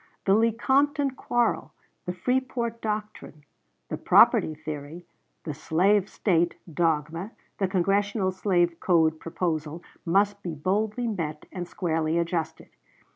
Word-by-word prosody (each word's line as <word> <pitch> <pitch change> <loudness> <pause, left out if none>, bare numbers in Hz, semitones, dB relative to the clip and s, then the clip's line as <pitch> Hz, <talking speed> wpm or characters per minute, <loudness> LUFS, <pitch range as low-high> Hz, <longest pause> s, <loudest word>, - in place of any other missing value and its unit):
The 195 - +4
Lecompton 265 +6 +2
quarrel, 240 -2 -1 0.3
the 180 - -1
Freeport 235 +2 -1
doctrine, 210 -8 -5 0.5
the - - -3
property 155 - +5
theory, 155 +3 -7 0.4
the 155 - -4
"slave 185 +7 +2
State" 175 -4 +1 0.2
dogma, 165 +4 -1 0.3
the 195 - +2
Congressional 195 +1 +1
slave 175 -3 +1
code 160 -3 +2
proposal, 165 -1 -3 0.2
must 200 +3 +2
be 175 -4 -5
boldly 210 - -1
met 165 -9 -3
and 180 -2 -5
squarely 165 -3 -1
adjusted. 165 -1 -2
180 Hz, 115 wpm, -26 LUFS, 165-210 Hz, 0.5 s, property